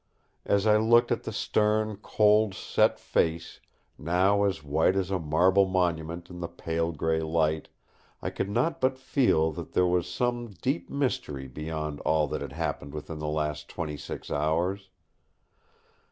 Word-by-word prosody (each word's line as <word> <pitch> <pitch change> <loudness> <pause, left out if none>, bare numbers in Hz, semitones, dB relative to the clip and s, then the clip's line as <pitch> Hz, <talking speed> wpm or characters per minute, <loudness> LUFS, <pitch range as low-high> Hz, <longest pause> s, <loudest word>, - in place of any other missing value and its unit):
As 100 +1 +2
I 105 -1 +5
looked 115 +2 +4
at - - -1
the - - -3
stern, 110 0 +1
cold, 105 -1 +3
set - - +1
face, 80 0 -1 0.4
now 95 +5 +2
as 95 -6 -1
white 80 +5 +2
as 95 -1 -1
a 95 - 0
marble 90 +5 +3
monument 85 -2 -1
in 90 -1 -10
the 85 - -3
pale 85 0 -2
grey 80 +1 0
light, 80 -1 0 0.5
I - - -4
could 100 - -3
not 130 +10 0
but 130 0 +2
feel 120 - +2
that 75 - -8
there 90 - +3
was 90 0 +1
some 120 +4 -1
deep 135 +5 -2
mystery 75 - -2
beyond 75 +2 -5
all 80 -1 +1
that - - -3
had - - -6
happened 70 +1 -4
within 75 +1 -6
the 75 - -4
last 75 -1 -2
twenty 80 -4 -4
six 70 - -7
hours. 85 +6 0
85 Hz, 160 wpm, -28 LUFS, 80-105 Hz, 0.5 s, I